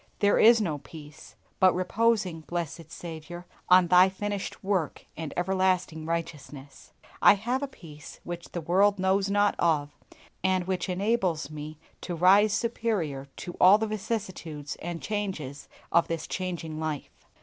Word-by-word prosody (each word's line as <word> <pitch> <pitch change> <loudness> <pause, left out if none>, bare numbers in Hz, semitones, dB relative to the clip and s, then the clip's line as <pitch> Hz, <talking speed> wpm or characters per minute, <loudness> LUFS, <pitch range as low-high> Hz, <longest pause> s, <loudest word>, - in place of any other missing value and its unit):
There 205 0 +3
is 230 +1 +7
no 160 -9 -2
peace! 150 0 -13 0.2
But 185 -1 +5
reposing, 195 -2 +1
blessed 165 -1 -5
Saviour, 175 +1 -8 0.2
on 180 0 +7
Thy 180 +1 +7
finished 200 +1 -5
work 190 -6 -1
and 160 -2 -5
everlasting 185 -3 0
righteousness, 150 -4 -6 0.3
I - - +8
have 240 +6 -2
a 280 - -2
peace 155 - -13
which 175 0 -7
the 175 - -3
world 195 +5 +3
knows 190 +1 +1
not 205 0 +3
of, 150 -4 +1 0.5
and 185 -1 +1
which 185 +1 -2
enables 185 -5 0
me 155 0 -7 0.2
to 175 - -4
rise 195 +5 +5
superior 205 - -2
to 175 - -7
all 190 +3 +8
the 220 - -1
vicissitudes 190 -9 -4
and 170 -1 -6
changes 190 -10 -4 0.2
of 170 0 +4
this 165 -1 -3
changing 170 -4 -4
life. 155 -3 -4
180 Hz, 145 wpm, -27 LUFS, 160-200 Hz, 0.5 s, I